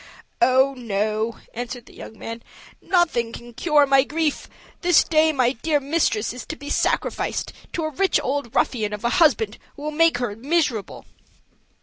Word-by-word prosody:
"Oh, 260 Hz, +3 st, +4 dB
sir," 215 Hz, -1 st, -2 dB
answered 245 Hz, +1 st, -6 dB
the -, -, -17 dB
young 220 Hz, -, -11 dB
man, 230 Hz, +2 st, -7 dB, 0.4 s
"nothing 325 Hz, -11 st, +1 dB
can 240 Hz, +1 st, -10 dB
cure 300 Hz, +2 st, +3 dB
my 270 Hz, -1 st, +4 dB
grief; 305 Hz, +1 st, -2 dB, 0.3 s
this 350 Hz, -3 st, +5 dB
day 315 Hz, 0 st, +3 dB
my 255 Hz, -5 st, +2 dB
dear 295 Hz, +4 st, 0 dB
mistress 275 Hz, -7 st, 0 dB
is 250 Hz, -2 st, -7 dB
to 315 Hz, -, -5 dB
be 285 Hz, -1 st, -7 dB
sacrificed -, -, -1 dB, 0.2 s
to 330 Hz, -, -2 dB
a 310 Hz, -, -2 dB
rich 385 Hz, +7 st, +2 dB
old 270 Hz, -3 st, -3 dB
ruffian 215 Hz, -4 st, 0 dB
of 210 Hz, -, -6 dB
a 235 Hz, -, +2 dB
husband 225 Hz, -9 st, +3 dB, 0.2 s
who 290 Hz, -, -10 dB
will 305 Hz, -, -2 dB
make 330 Hz, -2 st, +3 dB
her 240 Hz, -4 st, -3 dB
miserable." 260 Hz, -, -1 dB
260 Hz, 165 wpm, -23 LUFS, 230-310 Hz, 0.4 s, this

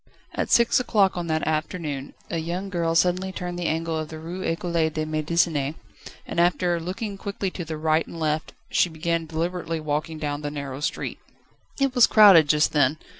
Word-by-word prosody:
At -, -, -2 dB
six 235 Hz, +1 st, +4 dB
o'clock 205 Hz, -6 st, +2 dB
on 175 Hz, -1 st, -3 dB
that 160 Hz, -1 st, 0 dB
afternoon 155 Hz, -3 st, -3 dB, 0.2 s
a 165 Hz, -, -1 dB
young 175 Hz, +4 st, -4 dB
girl 165 Hz, -2 st, 0 dB
suddenly 180 Hz, +2 st, +2 dB
turned 175 Hz, -1 st, -5 dB
the 175 Hz, -, -1 dB
angle 160 Hz, 0 st, -1 dB
of 155 Hz, -1 st, -5 dB
the 160 Hz, -, -7 dB
Rue 170 Hz, +4 st, -6 dB
Ecole 170 Hz, 0 st, -2 dB, 0.2 s
de 155 Hz, 0 st, -3 dB
Médecine, 155 Hz, -1 st, 0 dB, 0.5 s
and -, -, -3 dB
after 175 Hz, 0 st, +2 dB
looking 195 Hz, +4 st, -5 dB
quickly 200 Hz, -1 st, -3 dB
to 180 Hz, -, -5 dB
the 160 Hz, -1 st, -5 dB
right 155 Hz, +1 st, +1 dB
and 165 Hz, -, -9 dB
left 155 Hz, 0 st, -1 dB, 0.2 s
she 180 Hz, -, +3 dB
began 165 Hz, 0 st, -2 dB
deliberately 165 Hz, +1 st, -3 dB
walking 155 Hz, +1 st, -3 dB
along 145 Hz, 0 st, -2 dB
the 145 Hz, -, -3 dB
narrow 140 Hz, -2 st, -6 dB
street. 150 Hz, -, -3 dB, 0.6 s
It 275 Hz, -2 st, +1 dB
was 245 Hz, -2 st, +6 dB
crowded 195 Hz, -8 st, +7 dB
just 150 Hz, +1 st, +3 dB
then. 145 Hz, 0 st, +3 dB
165 Hz, 185 wpm, -24 LUFS, 155-180 Hz, 0.6 s, crowded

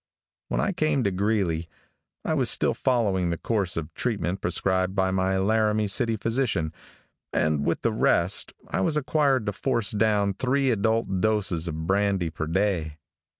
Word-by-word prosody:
When -, -, -1 dB
I -, -, +1 dB
came 155 Hz, -7 st, 0 dB
to 100 Hz, -, +1 dB
Greeley, 95 Hz, -4 st, 0 dB, 0.6 s
I -, -, 0 dB
was -, -, +1 dB
still -, -, +2 dB
following 100 Hz, -9 st, +1 dB
the 85 Hz, -, -1 dB
course 100 Hz, -5 st, -1 dB
of 80 Hz, -1 st, -4 dB
treatment 100 Hz, -5 st, -2 dB
prescribed 95 Hz, +2 st, 0 dB
by 95 Hz, -1 st, +1 dB
my 95 Hz, 0 st, +1 dB
Laramie 105 Hz, +1 st, +2 dB
City 115 Hz, +3 st, +1 dB
physician, 115 Hz, -9 st, -1 dB, 0.6 s
and 75 Hz, -2 st, +1 dB
with 85 Hz, -, -1 dB
the 115 Hz, -, +1 dB
rest, 90 Hz, -3 st, +1 dB, 0.2 s
I -, -, -1 dB
was 150 Hz, +10 st, +1 dB
required 140 Hz, -4 st, +1 dB
to 105 Hz, -, -2 dB
force 115 Hz, -1 st, -1 dB
down 105 Hz, -2 st, +2 dB
three 130 Hz, +4 st, +1 dB
adult 110 Hz, -3 st, 0 dB
doses 100 Hz, -6 st, +1 dB
of 80 Hz, 0 st, -4 dB
brandy 95 Hz, -2 st, +1 dB
per 80 Hz, 0 st, -4 dB
day. 85 Hz, -4 st, -1 dB
100 Hz, 160 wpm, -25 LUFS, 90-115 Hz, 0.6 s, still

